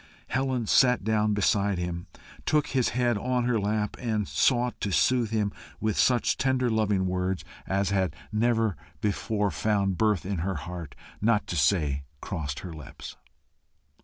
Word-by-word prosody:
Helen 130 -3 0
sat 125 +1 +4
down 105 0 +2
beside 100 0 +2
him, 85 0 -4 0.4
took 150 -2 +2
his 130 -3 +2
head 120 -4 +2
on 125 +2 0
her 120 -2 +1
lap, 105 +1 -1
and 110 -5 -1
sought 125 -1 +1
to 100 - -1
soothe 120 +3 +3
him 105 -2 0 0.3
with 110 -1 0
such 125 -2 +3
tender 130 -2 +2
loving 105 -3 +1
words 90 0 -1 0.2
as 100 0 0
had 95 -6 +1 0.2
never 110 -2 +2 0.2
before 105 0 0
found 100 -4 0
birth 105 -5 +2
in 100 0 -2
her 95 +3 -1
heart, 85 0 -7 0.3
not 105 -1 +2
to - - -4
say 75 -3 +2 0.2
crossed 75 -7 -4
her 90 -3 -7
lips. 75 -2 -9
105 Hz, 155 wpm, -27 LUFS, 95-115 Hz, 0.4 s, sat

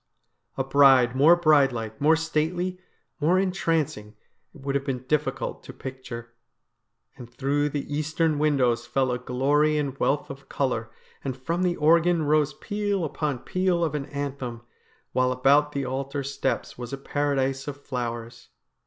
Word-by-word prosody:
A 135 - +1
bride 135 -2 +5
more 150 +6 +7
bride 155 -5 +4
like, 110 -1 -6
more 155 +3 +5
stately, 165 +3 -1 0.4
more 165 +5 +3
entrancing, 165 - -1 0.4
it 145 - -15
would 140 0 -2
have 140 0 0
been 130 -2 -3
difficult 135 -2 -1
to - - -9
picture. 120 -3 -8 0.8
And 120 -2 -10
through 140 +3 0
the 145 -1 -3
eastern 155 0 0
windows 135 -6 +2
fell 130 -2 +1
a 125 - -2
glory 145 +5 +2
and 140 -3 -2
wealth 145 0 0
of 135 0 -12
colour, 120 -5 -1 0.3
and 135 -2 -3
from 165 +7 -2
the 180 -1 +1
organ 165 +2 +3
rose 150 -1 +2
peal 205 -4 -2
upon 145 -4 -3
peal 185 -2 +1
of 160 -3 0
an 145 -2 -3
anthem, 135 -4 -5 0.5
while 130 0 +2
about 140 +3 +3
the 140 -2 -2
altar 135 +2 -3
steps 135 -2 -3
was 120 -1 -6
a 140 - -3
Paradise 135 -1 -1
of 140 -1 -5
flowers. 120 -4 -5
140 Hz, 155 wpm, -25 LUFS, 130-155 Hz, 0.8 s, more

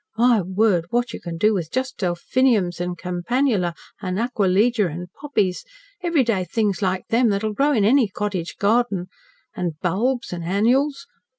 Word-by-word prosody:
My 235 -2 +4
word! 190 -1 +1
what 240 +2 -1
you - - -6
can 170 -1 -6
do 215 +5 +3
with 175 -6 -2
just 260 +4 -3
delphiniums 185 0 +1
an' 180 0 -2
campanula 180 +1 0 0.3
an' 185 -2 -3
acquilegia 215 -2 +2
an' 175 +3 -7
poppies, 210 -11 -1 0.4
everyday 260 - +1
things 205 +2 -1
like 185 -1 -1
them, 235 +1 +3
that'll 210 +1 -1
grow 280 +6 +2
in 220 -8 +2
any 250 +1 +4
cottage 195 -3 -4
garden, 205 -4 +1 0.5
an' 170 -4 -3
bulbs 230 +6 0
an' 175 - -4
annuals! 250 - +1
205 Hz, 155 wpm, -22 LUFS, 180-245 Hz, 0.5 s, My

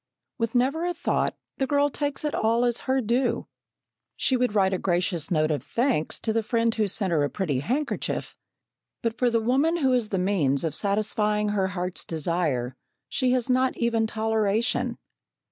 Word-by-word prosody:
With 230 +1 -1
never 270 +7 +2
a 350 0 -1
thought, 345 - 0 0.2
the 270 - +1
girl 285 0 +2
takes 290 +1 -2
it 300 - -1
all 230 +2 +2
as 240 -1 +1
her 265 0 +3
due. 245 +3 0 0.7
She 260 - +1
would 250 -3 0
write 190 -2 +3
a 185 - 0
gracious 175 -3 0
note 155 -2 +2
of 145 -4 -1
thanks 235 - 0
to 220 - 0
the 225 - +2
friend 230 +1 +1
who 215 -2 +1
sent 195 -1 -1
her 155 -3 +2
a 145 - 0
pretty 155 -10 -1
handkerchief, 265 - -2 0.7
but 230 -1 0
for 250 - +3
the 230 -1 +2
woman 270 +9 +2
who 265 -5 +2
is 240 -4 +1
the 195 - -1
means 175 -8 +1
of 160 -3 -1
satisfying 210 +2 0
her 200 -2 +1
heart's 180 +1 -3
desire 155 -6 -1 0.3
she 255 -1 +1
has 250 -2 +1
not 255 0 +2
even 230 -2 +1
toleration. 220 0 0
220 Hz, 180 wpm, -26 LUFS, 185-250 Hz, 0.7 s, her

